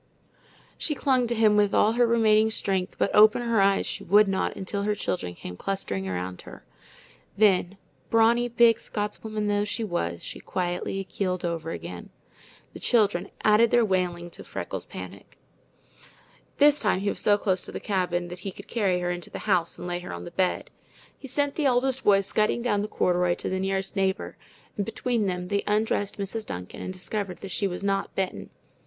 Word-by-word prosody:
She 300 Hz, -, 0 dB
clung 260 Hz, -4 st, +2 dB
to 235 Hz, -, -1 dB
him 215 Hz, -2 st, +4 dB
with 205 Hz, -1 st, +3 dB
all 215 Hz, -, +4 dB
her 240 Hz, +1 st, +3 dB
remaining 220 Hz, -2 st, +4 dB
strength, 190 Hz, -4 st, -2 dB
but -, -, 0 dB
open 215 Hz, +3 st, +6 dB
her 230 Hz, -3 st, +2 dB
eyes 195 Hz, 0 st, +3 dB
she -, -, -4 dB
would 205 Hz, +3 st, +5 dB
not 195 Hz, -1 st, -1 dB
until 200 Hz, +1 st, -4 dB
her 210 Hz, +1 st, 0 dB
children 90 Hz, -, -3 dB
came 90 Hz, -, -8 dB
clustering 100 Hz, -, -3 dB
around 90 Hz, 0 st, -4 dB
her. -, -, -13 dB, 0.7 s
Then, 195 Hz, -2 st, +3 dB, 0.3 s
brawny, 230 Hz, +2 st, +4 dB
big 235 Hz, -1 st, +4 dB
Scotswoman 210 Hz, 0 st, -3 dB
though 205 Hz, 0 st, +1 dB
she 210 Hz, +2 st, -2 dB
was, 85 Hz, -, -3 dB
she -, -, -6 dB
quietly 180 Hz, +2 st, -3 dB
keeled 185 Hz, -1 st, -3 dB
over 165 Hz, -1 st, -3 dB
again. -, -, -7 dB, 0.6 s
The -, -, -9 dB
children 205 Hz, -6 st, +2 dB
added 215 Hz, +2 st, +5 dB
their 240 Hz, 0 st, +4 dB
wailing 175 Hz, -3 st, -1 dB
to -, -, -9 dB
Freckles' -, -, -6 dB
panic. -, -, -10 dB, 1.2 s
This 295 Hz, 0 st, +5 dB
time 185 Hz, -, +1 dB
he 200 Hz, -, 0 dB
was -, -, -2 dB
so 205 Hz, -1 st, +4 dB
close 190 Hz, -3 st, 0 dB
the -, -, -6 dB
cabin 180 Hz, -3 st, -1 dB
that 180 Hz, 0 st, -8 dB
he 195 Hz, +1 st, -5 dB
could 200 Hz, -, -12 dB
carry 190 Hz, -6 st, 0 dB
her 175 Hz, 0 st, -1 dB
into 175 Hz, 0 st, -6 dB
the -, -, -8 dB
house 180 Hz, -5 st, +1 dB
and -, -, -7 dB
lay 175 Hz, 0 st, -2 dB
her 180 Hz, -, -8 dB
on 85 Hz, 0 st, -6 dB
the -, -, -8 dB
bed. 185 Hz, -1 st, -1 dB, 0.4 s
He 270 Hz, -, -11 dB
sent 285 Hz, +2 st, 0 dB
the 300 Hz, -3 st, +1 dB
oldest 260 Hz, +1 st, +1 dB
boy 195 Hz, -1 st, +5 dB
scudding 215 Hz, +4 st, 0 dB
down 205 Hz, -4 st, +1 dB
the 210 Hz, -, -2 dB
corduroy 180 Hz, -3 st, +1 dB
for -, -, -4 dB
the 190 Hz, -, -1 dB
nearest 195 Hz, 0 st, -2 dB
neighbor, 190 Hz, -1 st, -1 dB, 0.4 s
and 205 Hz, -, 0 dB
between 225 Hz, 0 st, -1 dB
them 180 Hz, -1 st, -3 dB
they 200 Hz, 0 st, +1 dB
undressed 210 Hz, -1 st, 0 dB
Mrs. 210 Hz, +2 st, -4 dB
Duncan 90 Hz, 0 st, -7 dB
and -, -, -4 dB
discovered 185 Hz, 0 st, -4 dB
that 195 Hz, -, -7 dB
she 200 Hz, +3 st, 0 dB
was 180 Hz, +1 st, -5 dB
not 195 Hz, 0 st, -1 dB
bitten. 190 Hz, -1 st, -3 dB
200 Hz, 190 wpm, -26 LUFS, 180-220 Hz, 1.2 s, open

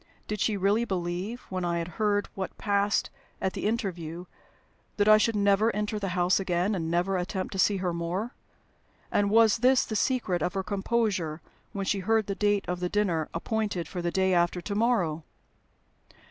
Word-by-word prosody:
Did 210 Hz, 0 st, -3 dB
she 210 Hz, +1 st, +1 dB
really 200 Hz, +4 st, +2 dB
believe, 185 Hz, +3 st, -3 dB
when 185 Hz, -1 st, -3 dB
I 170 Hz, -1 st, 0 dB
had 170 Hz, 0 st, -2 dB
heard 205 Hz, -1 st, +1 dB
what 190 Hz, -1 st, -5 dB
passed 200 Hz, 0 st, +1 dB, 0.3 s
at 190 Hz, -, -1 dB
the -, -, -2 dB
interview, 180 Hz, -7 st, -3 dB, 0.7 s
that 205 Hz, 0 st, +2 dB
I 215 Hz, 0 st, +8 dB
should 225 Hz, +1 st, +1 dB
never 200 Hz, +2 st, +3 dB
enter 210 Hz, 0 st, -2 dB
the 200 Hz, -, -3 dB
house 180 Hz, +2 st, +3 dB
again, 185 Hz, +1 st, 0 dB
and 165 Hz, -4 st, -2 dB
never 180 Hz, +3 st, +1 dB
attempt 185 Hz, +1 st, -3 dB
to 195 Hz, -, -4 dB
see 200 Hz, +1 st, +3 dB
her 180 Hz, -2 st, -1 dB
more? 175 Hz, +8 st, -3 dB, 0.8 s
And 205 Hz, 0 st, +2 dB
was 225 Hz, 0 st, +5 dB
this 255 Hz, +2 st, +4 dB
the 220 Hz, -, -4 dB
secret 210 Hz, -6 st, 0 dB
of 180 Hz, +2 st, -1 dB
her 195 Hz, -, -1 dB
composure 195 Hz, -6 st, -1 dB, 0.3 s
when 195 Hz, -1 st, -3 dB
she 200 Hz, +1 st, 0 dB
heard 220 Hz, +3 st, +1 dB
the 200 Hz, -, -2 dB
date 205 Hz, 0 st, +1 dB
of 180 Hz, 0 st, -2 dB
the 180 Hz, 0 st, -2 dB
dinner 180 Hz, -7 st, 0 dB
appointed 200 Hz, -1 st, -2 dB
for 175 Hz, -, -5 dB
"the 175 Hz, -, 0 dB
day 190 Hz, +1 st, +1 dB
after 175 Hz, 0 st, +2 dB
to 200 Hz, +4 st, -5 dB
morrow"? 200 Hz, -8 st, +1 dB
195 Hz, 190 wpm, -28 LUFS, 175-210 Hz, 0.8 s, I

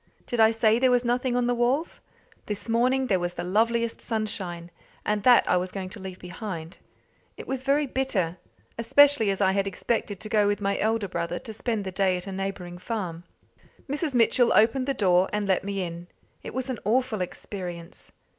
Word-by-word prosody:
Did 240 Hz, -, -3 dB
I 220 Hz, 0 st, +7 dB
say 225 Hz, 0 st, +3 dB
there 260 Hz, 0 st, +4 dB
was 245 Hz, 0 st, +2 dB
nothing 245 Hz, +1 st, 0 dB
on 245 Hz, 0 st, +2 dB
the 245 Hz, -, +2 dB
walls? 250 Hz, +7 st, 0 dB, 0.5 s
This 210 Hz, +1 st, -4 dB
morning 250 Hz, +3 st, +2 dB
there 195 Hz, -7 st, +1 dB
was 175 Hz, 0 st, -3 dB
the -, -, -4 dB
loveliest 230 Hz, +5 st, +1 dB
sunshine, 190 Hz, -6 st, -4 dB, 0.3 s
and 210 Hz, 0 st, 0 dB
that 245 Hz, +2 st, +6 dB
I 180 Hz, -, +3 dB
was 180 Hz, +1 st, -2 dB
going 190 Hz, -2 st, -5 dB
to 205 Hz, -, -9 dB
leave 190 Hz, -1 st, -7 dB
behind. 180 Hz, -3 st, -7 dB, 0.6 s
It -, -, -8 dB
was 265 Hz, -1 st, -2 dB
very 280 Hz, +2 st, +2 dB
bitter, 220 Hz, -11 st, -1 dB, 0.4 s
especially 270 Hz, -1 st, +5 dB
as 195 Hz, +1 st, -1 dB
I 190 Hz, -1 st, +4 dB
had 195 Hz, 0 st, 0 dB
expected 205 Hz, 0 st, -2 dB
to -, -, -6 dB
go 210 Hz, -2 st, +3 dB
with 205 Hz, 0 st, 0 dB
my 200 Hz, -1 st, 0 dB
elder 220 Hz, -1 st, 0 dB
brother 170 Hz, -1 st, -3 dB
to 220 Hz, -, -8 dB
spend 220 Hz, -2 st, -2 dB
the 190 Hz, -, -3 dB
day 190 Hz, -1 st, +1 dB
at 180 Hz, -, -7 dB
a 195 Hz, -, -6 dB
neighbouring 190 Hz, -2 st, -5 dB
farm. 180 Hz, -5 st, -4 dB, 0.6 s
Mrs. 290 Hz, 0 st, -2 dB
Mitchell 240 Hz, +1 st, +4 dB
opened 245 Hz, +5 st, +3 dB
the 275 Hz, -, 0 dB
door, 185 Hz, -4 st, +3 dB
and 210 Hz, -1 st, -1 dB
led 190 Hz, -2 st, +2 dB
me 195 Hz, -1 st, -2 dB
in. 170 Hz, 0 st, -7 dB, 0.3 s
It -, -, -8 dB
was 260 Hz, 0 st, -2 dB
an 255 Hz, -5 st, -3 dB
awful 230 Hz, -1 st, +1 dB
experience. 175 Hz, -2 st, -7 dB
210 Hz, 200 wpm, -26 LUFS, 185-240 Hz, 0.6 s, I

